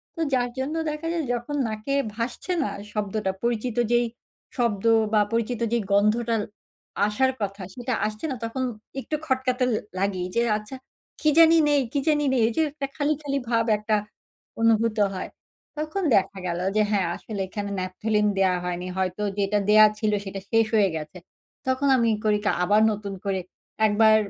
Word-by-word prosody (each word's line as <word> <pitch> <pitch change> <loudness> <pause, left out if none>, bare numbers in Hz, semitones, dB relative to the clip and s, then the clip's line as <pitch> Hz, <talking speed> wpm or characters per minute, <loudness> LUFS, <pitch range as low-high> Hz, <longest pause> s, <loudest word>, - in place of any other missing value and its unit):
তো 330 - -4
যার 245 -1 +2
জন্য 290 +5 -2
দেখা 300 +2 -4
যায় 330 -2 -1
যখন 240 +5 -3
নাকে 215 +5 -3 0.2
ভাসছে 240 +10 -4
না - - -1 0.2
শব্দটা 210 -2 -1
পরিচিত 235 0 -1 0.2
যেই 240 0 +4 0.5
শব্দ 230 -5 0 0.3
বা 210 - +5
পরিচিত 230 +1 -1
যে, - - +4
গন্ধটা 220 +3 +3 0.7
আসার 260 +5 +2
কথা 200 0 -3
সেটা 245 0 -3
আসছে 215 +6 -4
না - - -2
তখন 260 +3 -2 0.4
একটু 305 - -3
খটকা 260 -3 +1
তো 250 - +3 0.3
লাগেই 190 -2 -1
যে, 235 - +4 0.2
আচ্ছা 215 +5 -9 0.5
কি 305 - +4
জানি 330 0 +8
নেই, 290 -1 +4
কি 285 - +1
জানি 295 -1 +3
নেই। 250 -3 +2
এই 235 - -1
যে, - - +4
একটা 280 -2 -4
খালি, 300 0 +1
খালি 280 -1 -2
ভাব 230 -1 +2
একটা 215 +1 0 0.7
অনুভূত 230 -1 +3 0.2
হয়। 185 - -5 0.5
তখন 310 +6 -2
দেখা 195 0 +1
গেল 170 0 -2 0.2
যে, 215 - +4
হ্যাঁ, 195 -4 +2
আসলে 205 -3 -6
এখানে 200 +2 -4
ন্যাপথলিন 210 +3 0
দেয়া 190 -2 +3
হয়নি 180 0 -3
হয়তো 190 +2 -1 0.2
যেটা 200 +1 +1
দেয়া 215 0 +8
ছিল 215 -1 +1
সেটা 195 0 -5
শেষ 225 -1 +4
হয়ে 200 -3 +4
গেছে। 155 +3 -6 0.5
তখন 260 +2 +1
আমি 230 -2 +2
করি 210 -1 +3
কি - - +3
আবার 210 +3 +4
নতুন 200 -1 -5
করে, 195 -1 0 0.5
একবার 215 +1 +5
220 Hz, 175 wpm, -25 LUFS, 205-260 Hz, 0.7 s, জানি